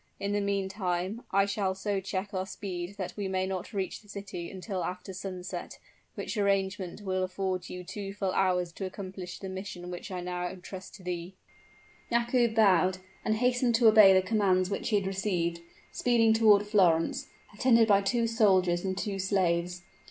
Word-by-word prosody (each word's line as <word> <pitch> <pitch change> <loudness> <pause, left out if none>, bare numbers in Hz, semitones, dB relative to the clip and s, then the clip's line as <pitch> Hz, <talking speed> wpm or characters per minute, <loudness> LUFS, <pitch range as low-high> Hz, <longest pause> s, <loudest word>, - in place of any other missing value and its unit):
In 200 - -2
the 205 0 +1
meantime, 195 0 -2
I 195 0 +3
shall 200 -2 -1
so 200 +1 -1
check 195 +1 -4
our 185 0 -2
speed 185 -2 -5
that 190 -3 -4
we 205 -2 -3
may 190 0 0
not 190 -1 -4
reach 195 -4 -3
the 205 - -22
city 190 -4 -6
until 190 0 -4
after 185 +1 -5
sunset, 185 -1 -6 0.4
which - - -4
arrangement 195 -1 0
will 185 -1 -1
afford 185 -1 -3
you 180 0 -6
two 195 +2 -6
full 195 -2 -2
hours 180 -2 +1
to 190 +3 -5
accomplish 185 -1 -7
the 195 - -7
mission 185 -2 -6
which 175 +3 -7
I 185 -2 -4
now 180 0 -3
trust 185 +1 -9
to 195 - -14
thee." 180 +1 -5 0.8
Yakoub 235 -1 +2
bowed, 185 -4 +4 0.3
and 215 - +1
hastened 245 0 +2
to 230 0 +5
obey 215 -3 +8
the 190 0 +5
commands 185 -2 +2
which 200 - -2
he 215 - +2
had 200 -2 +1
received 185 -3 -1 0.3
speeding 230 -2 +3
toward 210 -2 +5
Florence, 180 -6 +2 0.3
attended 230 +1 +4
by 200 -2 +5
two 230 +4 +1
soldiers 190 -6 +3
and 190 -1 -2
two 195 0 -3
slaves. 180 -2 0
190 Hz, 175 wpm, -29 LUFS, 185-205 Hz, 0.8 s, obey